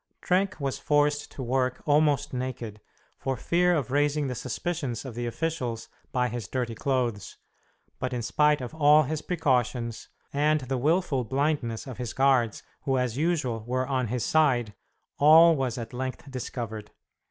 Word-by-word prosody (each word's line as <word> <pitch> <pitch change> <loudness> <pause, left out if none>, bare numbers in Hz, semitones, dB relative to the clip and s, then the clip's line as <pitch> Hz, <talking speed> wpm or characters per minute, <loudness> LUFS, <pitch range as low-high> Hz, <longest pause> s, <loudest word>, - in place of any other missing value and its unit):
Trenck 185 0 0
was 135 -2 -2
forced 145 0 +1
to 135 - -6
work 130 0 -1
almost 145 -1 +2
naked, 125 -4 -5 0.4
for 135 -1 -2
fear 180 +1 +2
of 140 -5 -2
raising 145 +1 +2
the 130 - -2
suspicions 135 -1 -3
of 130 - -6
the 120 +1 -3
officials 125 -4 -3 0.2
by 125 -1 +1
his 120 -1 -5
dirty 125 -3 -2
clothes, 120 -4 -2 0.6
but 130 +1 -2
in 120 -2 -3
spite 150 +4 +2
of 125 +4 -6
all 150 0 +5
his 155 +2 -3
precautions 125 -8 -1 0.3
and 150 +1 +2
the 130 +1 -2
wilful 150 -2 +1
blindness 135 -2 -1
of 130 -3 -8
his 125 -2 -4
guards, 130 -5 +2 0.2
who 135 -1 0
as 125 -3 -1
usual 140 -8 0
were 130 +1 0
on 130 -3 -1
his 125 +2 -2
side, 125 -9 +2 0.5
all 160 +3 +8
was 130 -4 -2
at 115 -1 -6
length 130 +2 -5
discovered. 115 -4 -5
130 Hz, 160 wpm, -27 LUFS, 120-150 Hz, 0.6 s, all